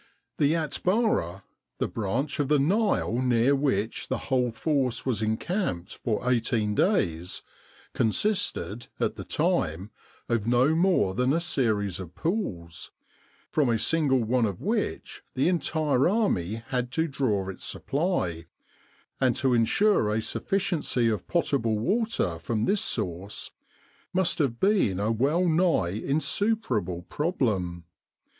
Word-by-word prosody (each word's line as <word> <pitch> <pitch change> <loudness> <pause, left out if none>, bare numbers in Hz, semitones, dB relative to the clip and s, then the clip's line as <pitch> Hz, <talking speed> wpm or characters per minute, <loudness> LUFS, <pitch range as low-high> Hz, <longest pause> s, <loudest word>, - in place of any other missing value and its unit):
The 150 +2 +3
Atbara 160 - 0 0.3
the - - 0
branch 120 +8 -2
of 145 - +1
the 150 +1 +4
Nile 165 - +1
near 125 +2 +3
which 130 -6 -1
the - - -1
whole 125 -2 0
force 130 0 -1
was 120 -6 0
encamped 110 - -2
for 115 +1 -1
eighteen 115 -3 +1
days 90 - 0 0.5
consisted, 115 - 0
at - - 0
the - - -6
time, 90 +7 -1 0.4
of 115 -2 0
no 125 +5 +4
more 165 - +2
than 125 +5 +1
a 165 - +2
series 110 - 0
of 90 -2 -9
pools, 100 - -3 0.6
from 145 -5 +2
a 115 - +2
single 135 -2 +2
one 115 +1 +2
of 100 -4 -5
which - - -2
the 130 - +2
entire 155 -5 +1
army 115 - 0
had 125 -2 -1
to 160 +1 +1
draw 120 -10 -1
its 95 - -8
supply, 135 - -2 0.7
and 130 -3 +2
to 130 -2 +2
ensure 120 - +3
a 110 - +1
sufficiency 160 - 0
of 105 -5 -3
potable 135 -10 +1
water 190 - 0
from 110 +5 -1
this 200 0 +2
source 95 -2 -3 0.6
must 185 -2 +1
have 125 -6 0
been 190 - +2
a 105 +2 +1
well 145 +10 +2
nigh 165 - +2
insuperable 135 - 0
problem. 105 - -1
125 Hz, 130 wpm, -27 LUFS, 105-165 Hz, 0.7 s, the